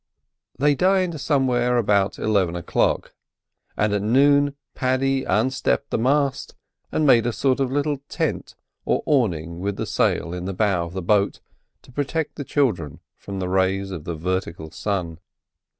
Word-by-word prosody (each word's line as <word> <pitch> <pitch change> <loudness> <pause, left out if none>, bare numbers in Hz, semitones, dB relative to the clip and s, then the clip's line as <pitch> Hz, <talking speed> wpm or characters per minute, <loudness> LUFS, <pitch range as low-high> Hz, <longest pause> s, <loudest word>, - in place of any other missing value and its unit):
They 145 +3 +3
dined 185 -1 +1
somewhere 125 -4 +2
about 100 -3 +2
eleven 95 -5 +1
o'clock, 85 - 0 0.6
and 105 -1 +1
at 100 - +1
noon 140 +5 +3 0.2
Paddy 135 +1 0
unstepped 130 +6 0
the - - 0
mast 140 +3 0 0.4
and 155 - +1
made 120 -4 +5
a - - +1
sort 130 +3 +1
of 135 -2 0
little 145 0 0
tent - - -3 0.3
or - - 0
awning 85 - 0
with 100 +2 -2
the - - -3
sail 85 - 0
in 90 0 -5
the 95 - -3
bow 95 -3 +1
of 85 - -11
the 95 -1 -4
boat 100 +2 +2 0.4
to - - -17
protect 145 +4 -2
the 145 - -6
children 100 - -1 0.2
from 100 -1 -8
the 95 -1 -2
rays 95 +1 0
of 85 -5 -6
the 85 - -3
vertical 85 -1 -3
sun. 90 -5 -3
110 Hz, 160 wpm, -23 LUFS, 95-135 Hz, 0.6 s, made